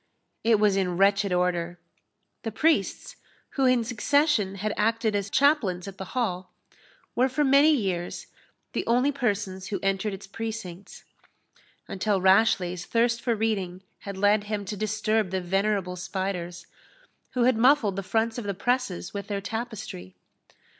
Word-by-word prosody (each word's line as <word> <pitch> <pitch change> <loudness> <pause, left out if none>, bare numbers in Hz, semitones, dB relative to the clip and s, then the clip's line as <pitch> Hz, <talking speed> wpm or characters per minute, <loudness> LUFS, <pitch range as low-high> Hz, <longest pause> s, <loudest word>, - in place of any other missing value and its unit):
It 225 -2 +4
was 205 -2 +3
in 180 -2 0
wretched 200 0 +3
order. 175 -1 0 0.6
The 225 - -4
priests, 320 +8 0 0.3
who 270 -2 +2
in 250 -2 +3
succession 245 -3 +1
had 210 +2 -2
acted 225 0 +1
as 200 -1 -1
chaplains 215 - +2
at 195 -1 -9
the 190 +6 -7
Hall, 185 -7 -2 0.6
were, 255 +2 +3
for 295 +4 0
many 280 +2 +5
years, 190 - -1 0.5
the - - -1
only 250 +5 +3
persons 200 -8 -2
who 200 - -3
entered 195 +2 0
its 195 - -11
precincts, 200 -3 -7 0.8
until 195 +1 0
Rashleigh's 185 -2 +3
thirst 235 0 +1
for 235 -2 0
reading 195 -4 -2 0.2
had 200 -1 -7
led 205 +1 +3
him 205 -1 -3
to 210 - -4
disturb 215 0 0
the 190 +1 -1
venerable 195 0 0
spiders, 180 -2 -4 0.7
who 250 - +1
had 250 0 +4
muffled 230 -4 +4
the 195 - -2
fronts 225 +4 -1
of 230 - -6
the 200 -1 -2
presses 210 -5 -1
with 200 -1 -5
their 200 -1 -2
tapestry. 215 - -6
205 Hz, 150 wpm, -26 LUFS, 190-230 Hz, 0.8 s, many